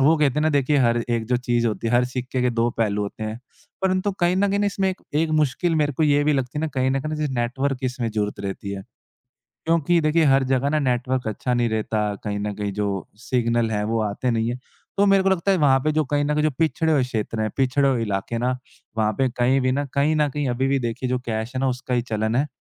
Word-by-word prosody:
वो 155 +5 +5
कहते 145 -4 +2
हैं 150 - +1
ना 155 - +3
देखिए 145 0 +2
हर 120 0 +2
एक 115 -1 0
जो 125 +2 +2
चीज़ 120 -1 0
होती 110 +1 -2
है 115 - 0
हर 120 +1 +4
सिक्के 125 0 -2
के 125 - +2
दो 115 0 +1
पहलू 105 -2 +1
होते 100 +2 -5
हैं। 110 +1 -4 0.4
परंतु 190 +1 +1
कहीं 175 +1 +3
न 200 +1 +2
कहीं 200 +1 +1
इसमें 195 -1 0
एक 185 - -8 0.2
एक 160 - -4
मुश्किल 160 +5 0
मेरे 145 0 0
को 150 - -1
ये 145 -1 +4
भी 150 - +3
लगती 135 +1 -2
है - - -1
ना 160 - 0
कहीं 130 0 +2
न 135 +1 0
कहीं 155 +3 -3
जैसे 150 -2 -2
नेटवर्क 130 +3 -1
की 130 - -2
इसमें 125 -2 -2
ज़रूरत 105 -1 -2
रहती 100 0 -5
है। 95 -1 -5 0.9
क्योंकि 170 +1 +3
देखिए 155 +2 +3
हर 135 -1 +4
जगह 135 +2 +2
ना 155 +1 +1
नेटवर्क 130 -1 0
अच्छा 115 +3 -2
नहीं 120 -1 +1
रहता। 110 0 -1 0.2
कहीं 105 -1 -2
न 105 0 -3
कहीं 105 0 -3
जो 105 +1 -1 0.3
सिग्नल 120 -2 0
है 105 -1 0
वो 115 +1 0
आते 110 +4 -1
नहीं 115 0 0
है। 120 - -3 0.4
तो 200 - +4
मेरे 195 -1 +4
को 195 - +3
लगता 190 +1 +1
है 190 - +3
वहाँ 140 -4 +4
पे 155 +4 0
जो 155 +1 +1
कहीं 145 0 +2
न 150 - 0
कहीं 150 0 +1
जो 155 - +3
पिछड़े 160 0 +1
हुए 145 -4 +3
क्षेत्र 115 -2 -3
हैं 110 - 0
पिछड़े 135 +1 +2
हुए 125 -3 0
इलाके 105 +1 -2
ना 125 +2 0 0.4
वहाँ 110 -1 +2
पे 135 - +2
कहीं 125 +2 +2
भी 130 0 +1
न, 140 +2 0
कहीं 145 +3 +2
न 150 -1 +2
कहीं 145 0 -2
अभी 125 +2 0
भी 135 0 +2
देखिए 120 +2 -3
जो 125 0 0
कैश 110 +2 -3
है - - 0
ना 135 - +2
उसका 125 0 -4
ही 120 - +2
चलन 110 -1 -2
है। 140 +4 +2
130 Hz, 270 wpm, -23 LUFS, 115-150 Hz, 0.9 s, वो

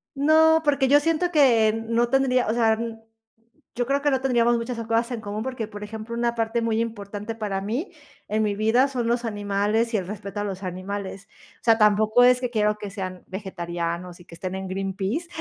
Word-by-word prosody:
No, 320 +3 +5
porque 280 -3 +2
yo 290 +2 +6
siento 330 +3 0
que, 235 -8 +4
no 235 +1 +1
tendría, 255 -1 +2
o 220 - +1
sea, 225 -2 +3 1.0
yo 245 0 -1
creo 275 +3 0
que 290 0 +2
no 265 - +1
tendríamos 240 -2 +3
muchas 235 +1 -4
cosas 230 +2 0
en 235 - -4
común, 210 +1 -4
porque, 250 -4 -4
por 205 -1 -9
ejemplo, 220 +2 -7
una 235 0 0
parte 230 0 0
muy 225 -1 0
importante 210 -1 -5
para 205 -3 -3
mí, 240 - -3 0.4
en 215 +1 0
mi 205 -1 0
vida, 225 +6 +3
son 250 -4 -2
los 235 +1 0
animales 210 +2 0
y - - +3
el 185 -3 -4
respeto 200 0 -6
a - - -1
los 195 -1 -5
animales. 190 +1 -5 0.3
O - - -48
sea, 225 -1 +5
tampoco 215 +2 +4
es 250 0 +6
que 250 - -1
quiero 210 -2 +1
que 210 -1 -6
sean 185 -3 -6
vegetarianos 175 -2 -5
y 175 - -15
que 170 - -13
estén 185 +2 -5
en 190 0 -5
Greenpeace. 195 - -3
220 Hz, 205 wpm, -24 LUFS, 200-245 Hz, 1.0 s, yo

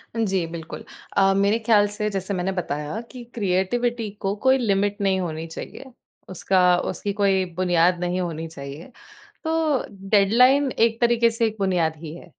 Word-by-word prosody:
जी, 195 -6 0
बिल्कुल। 165 0 -8 0.3
अ, 195 0 +5
मेरे 200 +3 +2
ख्याल 215 -2 +3
से 210 +1 -3
जैसे 195 0 -3
मैंने 185 +1 -1
बताया 150 0 -4
कि 250 -2 -9
क्रिएटिविटी 225 +3 -1
को 195 0 -1
कोई 260 +1 +5
लिमिट 205 -3 0
नहीं 190 -1 +1
होनी 165 -2 -4
चाहिए। 260 +10 -9 0.4
उसका 180 -1 +2
उसकी 200 -1 -4
कोई 195 -2 +2
बुनियाद 175 -1 +2
नहीं 180 +1 -1
होनी 165 -2 -4
चाहिए, 145 - -10 0.5
तो 320 -4 0 0.3
डेडलाइन 250 +7 +4
एक 230 0 +2
तरीके 235 -1 +4
से 230 0 0
एक 220 - -5
बुनियाद 175 -5 +1
ही 155 0 -8
है। - - -12
195 Hz, 160 wpm, -23 LUFS, 180-230 Hz, 0.5 s, अ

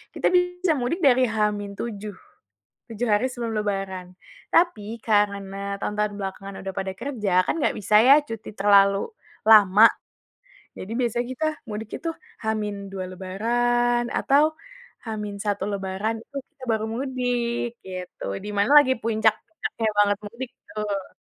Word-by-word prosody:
kita - - +1
bisa 360 -1 +2
mudik 290 +10 -1
dari 260 -2 +5
H-7, 210 -1 -3 0.7
7 230 +2 -3
hari 205 +5 +2
sebelum 235 -3 -4
lebaran 195 -3 -3 0.5
tapi 230 - +2
karena 200 -2 +1 0.2
tahun-tahun 210 0 -1
belakangan 195 0 -6
udah 195 - -4
pada 190 0 -3
kerja, 235 -7 -2
kan - - 0
enggak - - +1
bisa 210 +1 +1
ya 270 - +10
cuti 225 -1 -7
terlalu 200 -1 +5 0.5
lama, 210 0 +8 0.9
jadi 185 - -8
biasanya 240 0 0
kita 315 +5 -2 0.2
mudik 215 +1 -5
itu 330 - -2 0.3
H-2 205 -3 -3
lebaran 240 +6 +1
atau, 280 +2 +4 0.6
H-1 205 -2 -3
lebaran 195 +3 -2
itu 280 - -9
kita 285 -5 -17
baru 220 -1 0
mudik 245 -2 -1 0.2
gitu 185 -1 -8 0.2
di - - -4
mana 205 +7 +2
lagi 260 -2 +1
puncak-puncaknya 220 +2 0
banget 205 -1 +4
mudik 235 +4 -7 0.2
tuh. 205 -2 -4
215 Hz, 125 wpm, -24 LUFS, 200-240 Hz, 0.9 s, ya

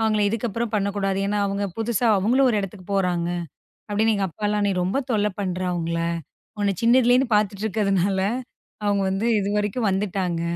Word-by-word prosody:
அவங்கள 215 -1 +2
இதுக்கப்புறம் 230 +1 -2
பண்ணக்கூடாது. 200 -1 0
ஏன்னா 210 +1 0
அவங்க 200 +1 -2
புதுசா 230 +1 0
அவங்களும் 245 +8 +3
ஒரு 215 - +1
இடத்துக்குப் 195 0 -7
போறாங்க 180 -3 +1 0.6
அப்படின்னு. 220 +2 +2
எங்க 195 -1 0
அப்பால்லாம் 210 +3 -1
"நீ - - +1
ரொம்ப 190 +9 0
தொல்ல 210 -2 +2
பண்ற 185 -2 -2
அவங்கள, 170 -1 -2 0.6
உன்ன 200 -1 +1
சின்னதிலலேந்து 245 +2 +4
பாத்துட்டு 205 0 +1
இருக்கதுனால 195 -2 +1 0.6
அவங்க 200 -1 +2
வந்து 195 +4 -1
இதுவரைக்கும் 210 +3 0
வந்துட்டாங்க," 190 -3 -1
205 Hz, 150 wpm, -23 LUFS, 195-220 Hz, 0.6 s, சின்னதிலலேந்து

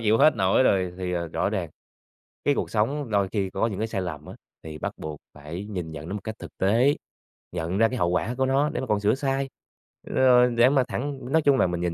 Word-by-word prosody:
chịu 110 0 +3
hết 155 -2 +5
nổi 95 +5 +3
rồi, 95 -6 +2
thì, 90 -1 -3
ờ, 85 -1 -2
rõ - - -1
ràng - - -3 0.8
cái 145 - +3
cuộc - - -2
sống 125 +5 0
đôi 100 -1 +2
khi 100 -3 -1
có 95 +4 0
những 100 -4 -4
cái 110 - -1
sai 95 - -2
lầm 75 -5 -5
á, - - -9 0.3
thì 80 -1 -7
bắt - - -4
buộc 75 -1 -6
phải 75 +6 -7
nhìn 90 -6 -5
nhận 80 +2 -8
nó - - -4
một 105 - -5
cách 110 0 -5
thực - - -9
tế. 115 +9 +3 0.6
Nhận 85 +2 -2
ra 115 +1 +5
cái 125 - -4
hậu 85 -3 +1
quả 115 +7 -1
của 130 - +2
nó, 140 +3 +2
để - - -3
mà 130 - -4
còn 105 -1 +1
sửa 105 +3 +2
sai, 135 0 -1 0.6
rồi 125 -1 +5
để 120 +2 +6
mà 135 -2 +3
thẳng 140 +3 -3
nói 160 - +5
chung 140 -3 +4
là - - +3
mình 90 -1 -3
nhìn 85 -1 -1
105 Hz, 255 wpm, -25 LUFS, 90-130 Hz, 0.8 s, để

